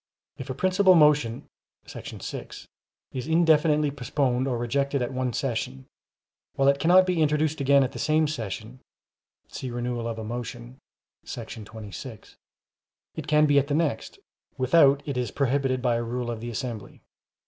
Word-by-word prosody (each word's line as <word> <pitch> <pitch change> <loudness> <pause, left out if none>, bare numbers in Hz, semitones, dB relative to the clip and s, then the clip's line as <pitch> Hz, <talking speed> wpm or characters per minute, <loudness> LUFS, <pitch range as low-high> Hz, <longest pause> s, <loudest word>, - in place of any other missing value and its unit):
If 130 - -7
a 130 - -3
principal 185 +3 +4
motion 150 -7 +3 0.4
[§ - - -9
6] - - -7 0.4
is 130 +1 -5
indefinitely 155 -2 +3
postponed 130 -1 -1
or 125 -3 -1
rejected 140 +4 -1
at 120 - -4
one 130 -1 -1
session, 110 - -3 0.7
while 135 - +2
it 140 0 +2
cannot 180 +3 +5
be 180 -3 0
introduced 150 0 +1
again 140 0 +5
at 130 - -2
the - - -8
same 155 0 +2
session 115 -2 -6 0.7
[see 130 - -6
Renewal 120 -1 -3
of 115 -1 -4
a 110 - -5
Motion, 110 - -7 0.5
§ 110 -2 -7
26], 110 +1 -10 0.8
it - - -7
can 150 0 +4
be 145 -1 +4
at 140 - -2
the 145 - 0
next, 150 -8 -1 0.4
without 140 +1 +4
it 140 -3 -3
is 125 -3 -1
prohibited 135 -1 0
by 120 -2 +2
a 120 - -2
rule 120 +1 -3
of 115 - -5
the 120 +1 -6
assembly. 115 -2 -6
130 Hz, 160 wpm, -26 LUFS, 120-150 Hz, 0.8 s, cannot